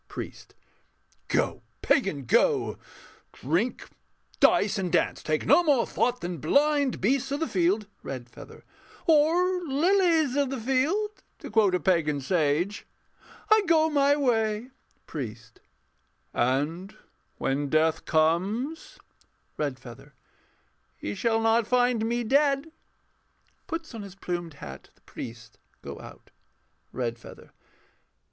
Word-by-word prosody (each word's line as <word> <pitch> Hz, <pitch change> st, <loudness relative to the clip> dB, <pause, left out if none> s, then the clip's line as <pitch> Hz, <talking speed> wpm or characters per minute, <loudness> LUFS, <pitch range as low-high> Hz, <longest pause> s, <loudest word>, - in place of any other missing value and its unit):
PRIEST. -, -, -9 dB, 0.7 s
Go, -, -, 0 dB, 0.2 s
pagan, 195 Hz, -, +1 dB
go! -, -, +2 dB, 0.5 s
Drink, 175 Hz, -, -1 dB, 0.5 s
dice, 205 Hz, 0 st, +4 dB
and 180 Hz, -3 st, -2 dB
dance: 175 Hz, -, +1 dB
take 155 Hz, 0 st, -1 dB
no -, -, +6 dB
more 285 Hz, -7 st, +3 dB
thought 250 Hz, 0 st, -1 dB
than 175 Hz, -2 st, -4 dB
blind 285 Hz, -, +2 dB
Beasts 265 Hz, +6 st, +1 dB
of 285 Hz, -, -1 dB
the 325 Hz, -, -1 dB
field.... 190 Hz, +4 st, +1 dB, 0.2 s
REDFEATHER. 120 Hz, -3 st, -9 dB, 0.4 s
Or... 340 Hz, +4 st, +3 dB
lilies 325 Hz, -1 st, +2 dB
of 285 Hz, -2 st, +1 dB
the 270 Hz, -1 st, -4 dB
field, 320 Hz, -, 0 dB, 0.2 s
To -, -, -9 dB
quote 210 Hz, -4 st, +3 dB
a -, -, +1 dB
pagan 155 Hz, -4 st, +1 dB
sage. 160 Hz, +5 st, 0 dB, 0.6 s
I 435 Hz, 0 st, +7 dB
go 320 Hz, -1 st, +4 dB
my 285 Hz, -1 st, +4 dB
way. 230 Hz, -3 st, 0 dB, 0.3 s
PRIEST 115 Hz, -6 st, -8 dB, 0.7 s
[solemnly]. 130 Hz, +3 st, +2 dB
And 180 Hz, +7 st, -8 dB, 0.4 s
when 140 Hz, +1 st, -1 dB
Death 160 Hz, +1 st, +2 dB
comes.... 195 Hz, -, 0 dB, 0.6 s
REDFEATHER. 135 Hz, -1 st, -6 dB, 0.8 s
He 100 Hz, -, -4 dB
shall 225 Hz, -, +1 dB
not 225 Hz, 0 st, +2 dB
find 245 Hz, -3 st, +2 dB
me 240 Hz, +1 st, -1 dB
dead. 280 Hz, +4 st, +2 dB, 1.0 s
[Puts 330 Hz, -4 st, -5 dB
on 225 Hz, -, -6 dB
his 200 Hz, -2 st, -10 dB
plumed 175 Hz, -4 st, -5 dB
hat. 70 Hz, -, -10 dB
The -, -, -31 dB
priests 115 Hz, -1 st, -10 dB, 0.2 s
go -, -, -7 dB
out.] -, -, -13 dB, 0.6 s
REDFEATHER. 115 Hz, -2 st, -6 dB
215 Hz, 120 wpm, -27 LUFS, -, 1.0 s, I